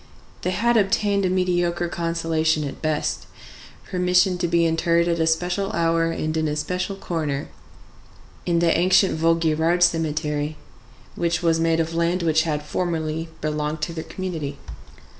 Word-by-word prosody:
They - - -1
had 230 +6 +2
obtained 200 -1 +2
a - - -1
mediocre 175 -1 0
consolation 165 -2 0
at 140 - -6
best,—permission 180 +3 -1
to 175 - 0
be 170 0 +2
interred 170 +1 +2
at 170 -1 0
a 160 - +2
special 180 +5 0
hour 165 -1 +1
and 155 -1 -2
in 160 -1 0
a 150 - -1
special 180 +5 -2
corner 155 -7 -3 0.9
in 175 -1 +1
the 170 -1 +3
ancient 185 +2 +4
Vaugirard 165 +1 +2
cemetery, 155 -2 0 0.6
which 170 0 -1
was 165 -1 +2
made 165 0 +2
of 165 0 -1
land 170 +2 0
which 160 -1 +3
had 150 -1 -1
formerly 160 0 -2
belonged 150 0 -2
to 170 - -2
their 160 -1 -5
community. 160 -7 -5
165 Hz, 145 wpm, -23 LUFS, 160-175 Hz, 0.9 s, ancient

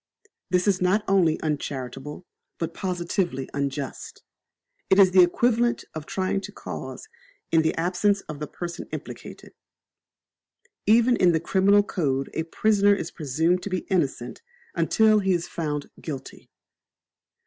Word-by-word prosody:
This 180 +1 +1
is 190 -2 +2
not 190 +4 +2
only 180 -5 +3
uncharitable, 145 +1 -4 0.3
but 165 0 -3
positively 175 -6 -2
unjust. 140 -1 -4 0.7
It 190 - +5
is 190 -2 +6
equivalent 235 +6 +3
to 155 - -5
trying 185 +5 -2
a 195 - -5
cause - - -7 0.4
in 165 - +5
the 160 - 0
absence 185 +4 +1
of 155 -2 -8
the 150 - -4
person 170 +2 -6
implicated. - - -8 1.3
Even 235 +3 +5
in 180 -5 +4
the 160 - +2
criminal 200 +4 +3
code 140 -9 -2
a - - -1
prisoner 205 +4 +3
is 165 -4 -5
presumed 160 +4 0
to 205 - -5
be 185 -2 -3
innocent 135 -9 -1 0.3
until 220 -1 +3
he 190 -2 +1
is 170 -1 -1
found 150 -3 -4
guilty. 145 -5 -8
175 Hz, 135 wpm, -25 LUFS, 155-195 Hz, 1.3 s, is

